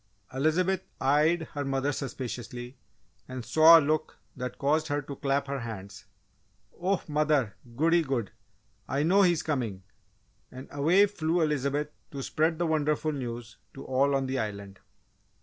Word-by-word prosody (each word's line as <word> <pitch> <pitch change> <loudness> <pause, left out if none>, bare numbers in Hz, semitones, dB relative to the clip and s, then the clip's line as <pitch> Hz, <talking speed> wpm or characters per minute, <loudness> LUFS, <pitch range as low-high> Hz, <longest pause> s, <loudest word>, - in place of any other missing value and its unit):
'" - - -28
Elizabeth 170 +7 +1 0.2
eyed 150 +5 +3
her 145 - -2
mother 135 +1 0
suspiciously 125 -2 -6 0.5
and 130 -2 -6
saw 160 +6 +8
a - - +6
look 155 +1 -1 0.2
that 125 -2 -5
caused 155 +3 +1
her 145 -1 0
to 140 0 -7
clap 140 +1 0
her 140 0 -3
hands. 105 -4 -8 0.7
"Oh, 190 +2 0
mother! 150 -7 +1 0.2
goody 165 +5 +3
good! 135 -9 -2 0.6
I 140 +2 0
know 190 +5 +4
he 180 -3 +5
is 170 0 -3
coming!" 115 -11 -2 0.7
And 130 +1 -9
away 165 +8 +4
flew 170 -4 -1
Elizabeth 150 -1 0 0.2
to 140 -2 -6
spread 160 +3 0
the 175 - 0
wonderful 155 -1 +1
news 120 -4 -6 0.2
to 135 - -9
all 140 +2 +2
on 135 -1 0
the 130 0 -2
Island. 100 -3 -5
140 Hz, 155 wpm, -28 LUFS, 130-155 Hz, 0.7 s, saw